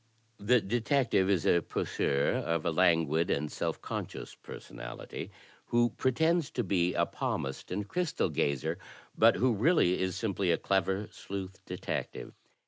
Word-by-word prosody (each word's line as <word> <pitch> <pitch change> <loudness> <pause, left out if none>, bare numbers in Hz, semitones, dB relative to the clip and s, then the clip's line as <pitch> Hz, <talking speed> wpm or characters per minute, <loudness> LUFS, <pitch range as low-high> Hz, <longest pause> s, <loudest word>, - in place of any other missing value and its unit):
The 120 +5 +4
detective 120 -2 +1
is 95 -5 +2
a 85 - +4
poseur, 70 -2 0
of 85 -1 -1
a 85 - +2
languid 80 -2 +3
and 75 +2 0
self - - -2
conscious - - -5
personality, - - -8 0.4
who 120 0 +3
pretends 160 +5 +1
to 120 - 0
be 90 -3 +1
a - - +3
palmist 65 0 -3
and 100 +3 -2
crystal 175 - 0
gazer, 80 +5 -1 0.4
but - - +6
who 125 0 +2
really 110 - +3
is 95 -1 -1
simply 100 -3 -1
a 85 - +4
clever 95 +1 0
sleuth 95 -1 -7
detective. - - -5
95 Hz, 140 wpm, -30 LUFS, 85-120 Hz, 0.4 s, but